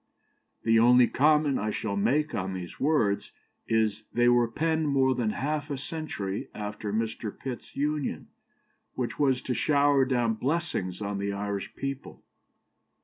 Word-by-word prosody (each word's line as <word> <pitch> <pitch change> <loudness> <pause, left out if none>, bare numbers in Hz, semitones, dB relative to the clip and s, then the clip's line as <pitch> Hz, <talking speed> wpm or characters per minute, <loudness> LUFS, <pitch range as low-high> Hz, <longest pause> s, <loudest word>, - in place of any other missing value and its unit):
" - - -47
The 115 0 +5
only 125 +2 +7
comment 150 +2 +3
I 105 - -1
shall 105 -1 -2
make 145 +10 +1
on 95 +1 -2
these 90 -1 -7
words 135 -9 +1 0.4
is: 110 -1 +1
they 120 0 +3
were 120 -1 +4
penned 160 +5 0
more 135 -1 +3
than 120 -3 0
half 145 +6 -2
a 140 - -2
century 130 -10 -4
after 105 0 -4
Mr. 110 0 -2
Pitt's 130 -3 -7
Union, 150 0 -2 0.7
which 125 -2 -3
was 130 -3 +2
to 125 - -1
shower 145 0 +3
down 120 -3 +1
blessings 110 - -2
on 100 0 -3
the 100 0 -1
Irish 100 0 -4
people. 135 -1 -6
120 Hz, 150 wpm, -28 LUFS, 105-145 Hz, 0.7 s, only